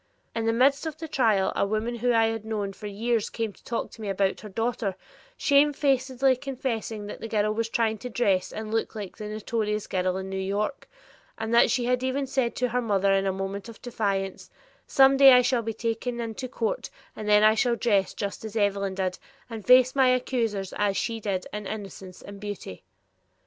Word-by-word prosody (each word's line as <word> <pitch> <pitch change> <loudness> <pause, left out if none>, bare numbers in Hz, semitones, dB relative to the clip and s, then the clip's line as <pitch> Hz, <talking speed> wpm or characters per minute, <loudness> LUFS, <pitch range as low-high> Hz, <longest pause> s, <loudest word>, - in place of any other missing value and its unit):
In 225 -1 -2
the - - +4
midst 275 +6 +3
of 310 -1 -5
the 320 - -6
trial 220 -9 +2
a - - +1
woman 215 +4 -1
whom 245 +2 +1
I 225 0 +5
had 225 -1 -2
known 210 -3 -3
for 210 - -8
years 225 +2 -1
came 225 -3 -3
to - - -23
talk 235 - -3
to 225 - -12
me 210 - -4
about 195 0 0
her 210 - -9
daughter, 225 -2 -2 0.4
shamefacedly 270 -3 +3
confessing 240 -5 -4
that 205 - -8
the 225 - -4
girl 215 -1 +1
was 225 +1 -2
trying 225 -3 0
to 250 - -6
dress 200 -6 +1
and 220 0 -6
look 225 0 -1
like 205 -4 -6
the 210 -2 -6
notorious 215 0 -2
girl 185 0 -1
in 190 0 -5
New 190 0 -4
York, 205 +7 -2 0.5
and 225 +1 -3
that 235 - +6
she 245 -2 +1
had 250 0 +1
even 260 +2 -1
said 260 -3 -1
to 250 0 0
her 250 +2 0
mother 200 -4 +2
in 195 0 +2
a - - +2
moment 195 +3 -5
of 230 - -12
defiance, 200 -5 -3 0.4
"Some 270 0 +5
day 270 -1 +9
I 250 0 +6
shall 245 -1 +1
be 225 0 -3
taken 230 +2 -3
into 230 +2 -4
court 460 - -3 0.3
and 215 -1 -5
then 210 0 +6
I 215 0 +7
shall 235 +2 +2
dress 205 -5 +1
just 200 +1 -4
as 220 -1 -7
Evelyn 200 -2 0
did 185 -1 -2 0.3
and 220 -2 -6
face 255 +2 +6
my 265 -2 +4
accusers 230 -6 -1
as 205 -2 +1
she 230 +1 -2
did 195 -4 -2
in 210 -1 -5
innocence 195 -3 -8
and 200 0 -10
beauty." 205 - -7
225 Hz, 210 wpm, -26 LUFS, 200-245 Hz, 0.5 s, day